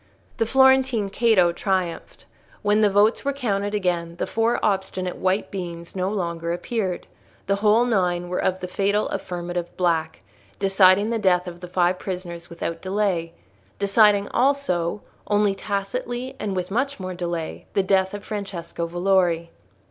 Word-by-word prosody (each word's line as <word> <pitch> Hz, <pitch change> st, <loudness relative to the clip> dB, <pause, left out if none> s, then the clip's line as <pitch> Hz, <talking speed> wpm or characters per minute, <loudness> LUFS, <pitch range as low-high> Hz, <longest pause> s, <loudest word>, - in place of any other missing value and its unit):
The 225 Hz, -, +1 dB
Florentine 265 Hz, -5 st, +4 dB
Cato 205 Hz, -6 st, +4 dB
triumphed. 185 Hz, -1 st, -3 dB, 0.4 s
When 210 Hz, +1 st, +3 dB
the 210 Hz, -, +5 dB
votes 205 Hz, +3 st, +3 dB
were 280 Hz, 0 st, 0 dB
counted 205 Hz, -6 st, -1 dB
again, 175 Hz, -4 st, -1 dB
the -, -, -2 dB
four 230 Hz, +1 st, +1 dB
obstinate 190 Hz, -2 st, -1 dB
white 190 Hz, +2 st, 0 dB
beans 170 Hz, -3 st, -6 dB
no 185 Hz, 0 st, 0 dB
longer 170 Hz, -4 st, -2 dB
appeared; 185 Hz, 0 st, -2 dB, 0.4 s
the 200 Hz, +1 st, +1 dB
whole 215 Hz, +3 st, +4 dB
nine 180 Hz, -6 st, +1 dB
were 180 Hz, -, -2 dB
of 185 Hz, 0 st, 0 dB
the 180 Hz, -, -3 dB
fatal 200 Hz, +3 st, 0 dB
affirmative 175 Hz, -1 st, -4 dB
black, 170 Hz, -3 st, 0 dB, 0.3 s
deciding 195 Hz, +2 st, +4 dB
the 230 Hz, -, 0 dB
death 180 Hz, -3 st, +2 dB
of 175 Hz, -1 st, -7 dB
the 180 Hz, -, -8 dB
five 180 Hz, 0 st, +1 dB
prisoners 175 Hz, -2 st, -6 dB
without 165 Hz, 0 st, -5 dB
delay—deciding 190 Hz, -, +1 dB
also, 210 Hz, -10 st, 0 dB, 0.2 s
only 205 Hz, -1 st, +2 dB
tacitly 240 Hz, +6 st, -4 dB
and 200 Hz, -2 st, -3 dB
with 180 Hz, 0 st, -3 dB
much 275 Hz, +5 st, -1 dB
more 185 Hz, -1 st, -4 dB
delay, 170 Hz, -2 st, -4 dB
the 195 Hz, -, +3 dB
death 190 Hz, +1 st, +2 dB
of 205 Hz, -, -8 dB
Francesco 195 Hz, -5 st, -4 dB
Valori. 175 Hz, -1 st, +1 dB
190 Hz, 150 wpm, -23 LUFS, 175-210 Hz, 0.4 s, the